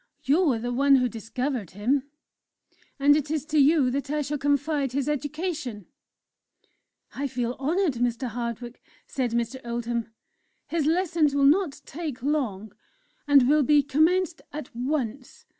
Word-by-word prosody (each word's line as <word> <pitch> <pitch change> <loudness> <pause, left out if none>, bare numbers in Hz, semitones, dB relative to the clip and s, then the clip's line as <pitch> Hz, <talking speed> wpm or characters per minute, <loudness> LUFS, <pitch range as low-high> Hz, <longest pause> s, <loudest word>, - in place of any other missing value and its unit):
You 310 +3 +3
are 235 - 0
the 245 +2 -3
one 275 +2 +5
who 250 -1 +3
discovered 235 - -4
him, 255 +8 -1 0.9
and 290 +1 +5
it 295 -1 -1
is 305 -2 -2
to 310 -1 +1
you 280 -2 +4
that 280 +2 -3
I 300 0 0
shall 290 +1 -3
confide 285 -1 0
his 275 0 -1
education." 295 - -3 1.3
"I 280 +1 -2
feel 245 -1 -3
honoured, 300 -2 0
Mr. 245 +1 0
Hardwick," 235 +1 -5 0.2
said 255 -3 -2
Mr. 235 +3 -2
Oldham; 235 -1 -3 0.6
"his 320 -3 -1
lessons 325 -3 +2
will 280 -1 +3
not 315 +1 +3
take 295 -5 -6
long, 220 -9 -2 0.5
and 280 -3 +6
will 300 +2 +4
be 290 +1 +4
commenced 320 +3 +1
at 290 -5 -8
once. 260 - -3
275 Hz, 145 wpm, -26 LUFS, 245-300 Hz, 1.3 s, and